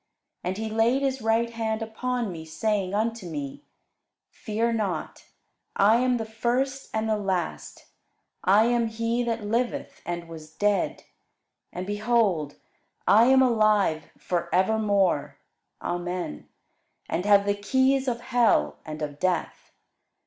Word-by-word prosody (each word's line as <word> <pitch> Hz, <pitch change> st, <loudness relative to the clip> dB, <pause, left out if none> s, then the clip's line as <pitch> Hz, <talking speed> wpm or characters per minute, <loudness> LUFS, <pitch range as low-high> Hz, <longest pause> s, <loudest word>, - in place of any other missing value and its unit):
And 185 Hz, +2 st, -2 dB
he 220 Hz, +1 st, -3 dB
laid 225 Hz, +5 st, +2 dB
his 265 Hz, -1 st, -1 dB
right 225 Hz, +1 st, +1 dB
hand 225 Hz, -1 st, -2 dB
upon 235 Hz, 0 st, -2 dB
me, 165 Hz, -2 st, -7 dB
saying 195 Hz, +4 st, -1 dB
unto 225 Hz, -2 st, -1 dB
me, 145 Hz, -, -5 dB, 0.7 s
Fear 230 Hz, +2 st, -1 dB
not; 200 Hz, -8 st, -3 dB, 0.5 s
I 210 Hz, +3 st, +5 dB
am 250 Hz, 0 st, +2 dB
the 225 Hz, -, -3 dB
first 250 Hz, +5 st, -1 dB
and 220 Hz, 0 st, -1 dB
the 220 Hz, -, +2 dB
last: 190 Hz, -4 st, -3 dB, 0.6 s
I 205 Hz, +4 st, +5 dB
am 235 Hz, -1 st, +2 dB
he 230 Hz, +2 st, -1 dB
that 230 Hz, -2 st, -2 dB
liveth, 235 Hz, +4 st, -2 dB
and 175 Hz, -1 st, -5 dB
was 160 Hz, -1 st, -11 dB
dead; 205 Hz, +2 st, 0 dB, 0.7 s
and, 180 Hz, +1 st, -5 dB
behold, 205 Hz, -7 st, +1 dB, 0.5 s
I 220 Hz, +3 st, +7 dB
am 265 Hz, +1 st, +6 dB
alive 215 Hz, -, +2 dB
for 175 Hz, -2 st, -2 dB
evermore, 200 Hz, -4 st, +1 dB, 0.5 s
Amen; 175 Hz, -, -4 dB, 0.6 s
and 175 Hz, -, -1 dB
have 200 Hz, -1 st, +5 dB
the 205 Hz, -, +2 dB
keys 260 Hz, +6 st, +1 dB
of 240 Hz, -1 st, -1 dB
hell 235 Hz, -, +2 dB
and 155 Hz, 0 st, -6 dB
of 145 Hz, -1 st, -5 dB
death. 185 Hz, -3 st, -2 dB
215 Hz, 135 wpm, -26 LUFS, 180-235 Hz, 0.7 s, I